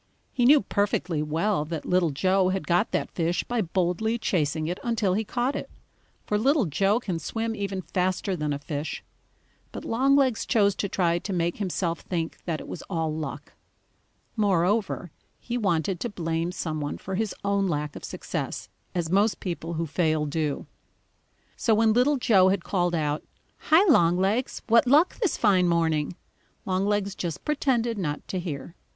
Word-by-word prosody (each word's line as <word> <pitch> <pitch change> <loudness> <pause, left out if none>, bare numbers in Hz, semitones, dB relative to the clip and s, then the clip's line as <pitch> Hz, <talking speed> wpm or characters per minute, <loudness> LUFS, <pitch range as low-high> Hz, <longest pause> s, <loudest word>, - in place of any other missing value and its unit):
He 245 -3 +2
knew 290 +4 +7
perfectly 195 -5 0
well 160 +4 0
that 160 0 -5
Little 180 -2 +2
Joe 185 +6 +2
had 190 0 -2
got 175 0 +2
that - - -2
fish 170 0 0
by 240 -2 -1
boldly 185 +5 0
chasing 160 -7 0
it 175 +3 -3
until 225 -6 +1
he 215 +4 0
caught 245 +5 -1
it, - - -5 0.6
for 210 - 0
Little 270 +2 +3
Joe 195 +8 +2
can 185 -8 -3
swim 225 +8 -3
even 195 -2 -3
faster 185 +2 -1
than 150 -3 -2
a 145 - -1
fish. 145 +1 -5 0.7
But - - -7
Longlegs 265 0 +2
chose 205 -3 +3
to 200 - -1
try 175 -2 +1
to 200 - -6
make 170 -1 0
himself 180 -4 -2
think 165 -3 -4
that 165 -3 -2
it - - -9
was 170 - -6
all 160 -4 -1
luck. 155 -1 -6 0.8
Moreover, 200 -3 +1 0.3
he 240 - -5
wanted 180 -5 0
to 240 - -2
blame 165 -3 -2
some 155 -4 -3
one 145 - -3
for 190 - -7
his 210 +1 -1
own 200 -1 +2
lack 150 -3 -2
of - - -9
success, - - -5 0.3
as 170 -2 -1
most 205 +3 +3
people 170 -2 -4
who 165 0 -1
fail 155 -1 +1
do. 150 -1 -2 0.9
So 225 - +2
when 220 0 +4
Little 260 +5 +3
Joe 205 -7 +5
had 190 -2 0
called 175 -3 0
out: 150 -1 -1 0.5
"Hi, 320 +5 +7
Longlegs, 195 - +2
what 230 +2 +4
luck 300 +7 +4
this 410 -8 0
fine 190 -5 +4
morning?" 165 -2 +1 0.5
Longlegs 200 +1 0
just 170 -4 -5
pretended 240 -7 0
not 150 -5 -3
to 185 - -2
hear. 160 -3 -5
185 Hz, 170 wpm, -26 LUFS, 165-220 Hz, 0.9 s, knew